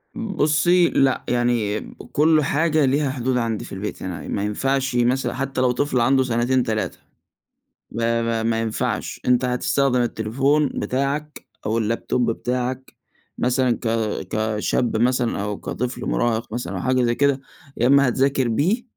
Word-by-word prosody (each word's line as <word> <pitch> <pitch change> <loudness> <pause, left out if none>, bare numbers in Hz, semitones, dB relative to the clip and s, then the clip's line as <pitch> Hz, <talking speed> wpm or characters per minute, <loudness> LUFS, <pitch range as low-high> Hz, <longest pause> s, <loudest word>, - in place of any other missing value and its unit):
بُصي 175 -5 +2
لأ، 135 -1 +2
يعني 120 -4 +1 0.3
كل 155 +1 +4
حاجة 155 +1 +2
ليها 140 +2 +1
حدود 130 -1 -1
عندي 115 -3 -2
في - - -12
البيت، 100 +2 -5
يعني 90 -2 -6
ما 100 - -2
ينفعش 135 +5 -1
مثلًا 125 +2 +1
حتى 135 -1 -2
لو 125 -1 +3
طفل 130 0 0
عنده 130 +3 +3
سنتين 125 +1 +1
3، 110 -2 -2 0.9
ما 115 +1 0
ما 115 -1 -1
ما 115 0 +1
ينفعش 110 -1 -3
أنت 125 0 +3
هتستخدم 125 +1 +1
التليفون 135 +6 +1
بتاعك 140 +3 -2 0.2
أو 110 +2 0
اللابتوب 115 +2 0
بتاعك 125 +2 -3 0.4
مثلًا 125 0 +1
ك - - -2 0.4
كشاب 110 +2 0
مثلًا 120 -2 +1
أو 105 -1 -3
كطفل 125 +2 -4
مُراهق 110 - -1
مثلًا 120 -6 -4
أو 90 - -3
حاجة 130 +2 +1
زي 120 0 +1
كده 140 0 +2 0.4
يا 120 - +2
إما 140 0 +5
هتذاكر 135 +1 +1
بيه، 170 - +1
125 Hz, 150 wpm, -22 LUFS, 115-135 Hz, 0.9 s, إما